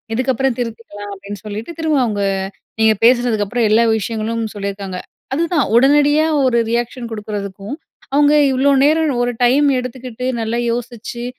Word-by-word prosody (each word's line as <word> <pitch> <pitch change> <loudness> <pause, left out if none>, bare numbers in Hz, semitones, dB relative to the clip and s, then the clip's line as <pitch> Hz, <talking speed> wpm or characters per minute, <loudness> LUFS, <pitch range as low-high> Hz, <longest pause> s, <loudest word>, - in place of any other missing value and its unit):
இதுக்கப்புறம் 260 +1 0
திருத்திக்கலாம்" 215 -3 -6
அப்பிடின்னு 200 +2 -9
சொல்லிட்டு, 215 +9 -6
திரும்ப 315 -3 +1
அவுங்க 205 -3 -2 0.6
நீங்க 220 0 +5
பேசினதுக்கப்புறம் 235 -2 +2
எல்லா 225 +2 +5 0.2
விஷயங்களும் 225 +2 -3
சொல்லியிருக்காங்க. 195 -2 -5 0.4
அதுதான் 330 -2 +1
உடனடியா 290 +4 +4 0.2
ஒரு 235 -2 +2
ரியாக்ஷன் 240 0 -2
குடுக்குறதுக்கும், 205 +1 -6 0.4
அவுங்க 290 +1 +4 0.2
இவ்ளோ 265 +2 +2
நேரம் 310 0 +3
ஒரு 245 0 0
டைம் 280 +4 +4
எடுத்துக்கிட்டு, 250 -1 -6
நல்லா 225 +1 -2
யோசிச்சு, 235 0 -5
235 Hz, 125 wpm, -18 LUFS, 215-265 Hz, 0.6 s, நீங்க